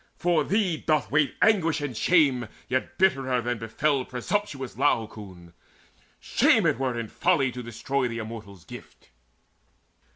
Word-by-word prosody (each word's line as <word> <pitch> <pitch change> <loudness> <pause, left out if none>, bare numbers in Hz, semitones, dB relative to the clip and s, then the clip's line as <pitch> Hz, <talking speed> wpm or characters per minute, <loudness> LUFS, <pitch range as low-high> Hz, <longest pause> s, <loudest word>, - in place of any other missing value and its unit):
For 170 -3 +1
thee 195 -2 0
doth 155 -1 0
wait 145 -1 +2
Anguish 170 -8 +3
and 145 -4 -4
shame 140 -6 +3 0.2
yet 130 0 -2
bitterer 135 -9 +2
than 120 -1 -3
befell 130 +5 0
Presumptuous 135 +1 -3
Laocoon. 105 -10 -2 0.7
Shame - - +3
it 115 - +1
were 130 -3 -1
In 115 - -4
folly 135 +1 +1
to 125 - -7
destroy 120 +3 -2
the 115 -1 -5
Immortals' 110 -5 -8
gift." - - -13
130 Hz, 135 wpm, -26 LUFS, 115-155 Hz, 0.7 s, Anguish